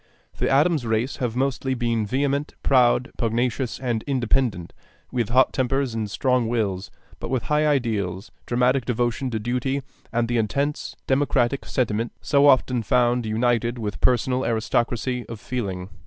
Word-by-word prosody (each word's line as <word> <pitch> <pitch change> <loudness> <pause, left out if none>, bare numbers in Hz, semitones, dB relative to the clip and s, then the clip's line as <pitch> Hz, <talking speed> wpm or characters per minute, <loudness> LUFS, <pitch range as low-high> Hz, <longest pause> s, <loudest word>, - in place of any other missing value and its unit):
The - - +1
Adams 150 +1 +3
race 115 +3 -1
have 120 -3 -2
mostly 130 0 0
been 115 -3 0
vehement, 140 +4 -1
proud, 125 0 +3
pugnacious, 120 +2 -1
and 120 -4 -1
independent, 120 -8 0 0.4
with 120 -4 -1
hot 130 +2 +4
tempers 135 -1 0
and 110 -2 -3
strong 125 +1 +1
wills; 105 -5 -1 0.3
but - - -5
with 130 -2 -1
high 150 0 +2
ideals, 110 -9 -1 0.2
dramatic 125 +2 +2
devotion 120 +2 -1
to 115 - -2
duty, 125 +5 -1 0.3
and 115 0 0
the 120 0 +1
intense 140 +7 -2
democratic 135 -1 +1
sentiment 115 -2 -1
so 145 0 +3
often 130 -2 +4
found 120 +1 +2
united 120 +2 +1
with 105 -4 -5
personal 125 +1 +2
aristocracy 120 +2 0
of 115 -2 -7
feeling. 95 -7 -4
120 Hz, 145 wpm, -24 LUFS, 115-130 Hz, 0.4 s, hot